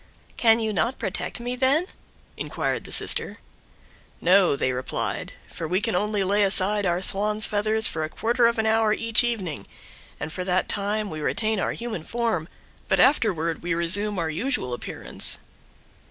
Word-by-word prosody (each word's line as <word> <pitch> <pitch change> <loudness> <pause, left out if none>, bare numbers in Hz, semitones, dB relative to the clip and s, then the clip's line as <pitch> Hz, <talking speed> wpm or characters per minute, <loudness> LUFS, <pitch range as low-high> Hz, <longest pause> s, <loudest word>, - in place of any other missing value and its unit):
"Can 225 -1 +4
you 220 -1 -1
not 235 +5 0
protect - - -3
me, 245 +1 -3
then?" 270 +6 +2 0.5
inquired - - -3
the - - -7
sister. - - 0 0.8
"No," 180 -2 +4
they 130 - 0
replied, 125 0 -3
"for 165 - -6
we 180 +4 +1
can 225 0 -1
only 210 +1 0
lay 200 +2 +2
aside 200 0 +2
our 175 +1 0
swan's 210 +3 +1
feathers 215 +1 +1
for 160 - 0
a 155 - -3
quarter 235 +5 +2
of 235 - 0
an 220 - +1
hour 220 -1 +3
each 230 0 +3
evening, 185 - -3 0.5
and 155 +1 -5
for 185 - -3
that 180 0 +1
time 205 +1 -1
we 155 -1 -5
retain 215 +6 0
our - - 0
human 230 -8 -5
form, 225 -7 -1 0.4
but - - +2
afterward 175 - +2
we 170 -1 -1
resume 195 +5 +3
our 165 -2 -1
usual 165 - -1
appearance." 120 - -5
205 Hz, 170 wpm, -25 LUFS, 175-225 Hz, 0.8 s, Can